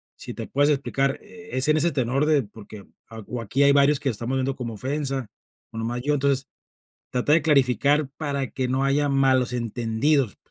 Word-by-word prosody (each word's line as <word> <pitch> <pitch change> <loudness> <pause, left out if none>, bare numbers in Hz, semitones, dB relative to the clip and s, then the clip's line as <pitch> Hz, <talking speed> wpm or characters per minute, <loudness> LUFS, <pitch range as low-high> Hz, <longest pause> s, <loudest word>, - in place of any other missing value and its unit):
si - - -9
te - - -7
puedes 145 +2 +2
explicar, 135 -1 0
eh, 220 +1 -14
es 130 +2 +3
en 155 - +4
ese 170 +3 +3
tenor 135 +1 0
de 150 -3 +3
porque, 105 -1 -12 0.2
ah 110 -1 -9
o 125 -1 -5
aquí 115 +6 0
hay 140 0 +5
varios 140 0 +4
que 140 - -4
lo - - +1
estamos 120 +5 -2
viendo 130 +1 -1
como 120 -4 -6
ofensa, 135 +1 -2 0.4
o - - -10
nomás 120 +2 -3
yo, 145 +4 0
entonces, 140 -2 0 0.6
trata 125 +4 +1
de 160 - +4
clarificar 145 0 +2
para 140 -4 -2
que 130 -1 -2
no 130 +2 0
haya 145 +1 +1
malos 130 -2 +2
entendidos",, 120 +2 0
135 Hz, 200 wpm, -24 LUFS, 125-145 Hz, 0.6 s, hay